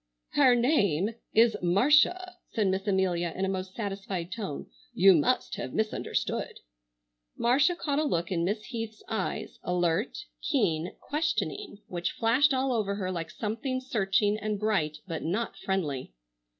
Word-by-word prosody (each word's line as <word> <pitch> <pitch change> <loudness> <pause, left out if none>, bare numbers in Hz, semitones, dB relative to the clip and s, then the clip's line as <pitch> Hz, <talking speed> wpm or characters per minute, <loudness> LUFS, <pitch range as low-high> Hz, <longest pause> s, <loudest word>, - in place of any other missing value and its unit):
"Her 260 -4 +5
name 215 - +2 0.2
is 225 0 +5
Marcia," 300 - +3 0.2
said 210 -4 +2
Miss 190 +2 -1
Amelia 180 -3 +1
in 190 - 0
a - - -1
most 190 0 -4
satisfied 195 -4 -4
tone; 200 -11 -4 0.3
"you 195 +1 +7
must 175 +10 +1
have - - -5
misunderstood." 220 0 -2 0.8
Marcia 270 +9 +3
caught 290 -4 -1
a - - +2
look 170 - -1
in 170 -2 0
Miss 210 +4 -1
Heath's 225 -3 -6
eyes, 220 -1 -3
alert, 180 - 0 0.2
keen, 175 - 0
questioning, 325 - -2
which 175 -1 -3
flashed 255 +6 +3
all 260 0 +1
over 205 -4 0
her 185 -2 -2
like 165 -3 -4
something 230 - -3
searching 210 -4 +1
and 210 -1 -2
bright 190 -8 0
but 165 -3 -4
not 195 +5 -2
friendly. 165 - -2
210 Hz, 145 wpm, -28 LUFS, 185-245 Hz, 0.8 s, you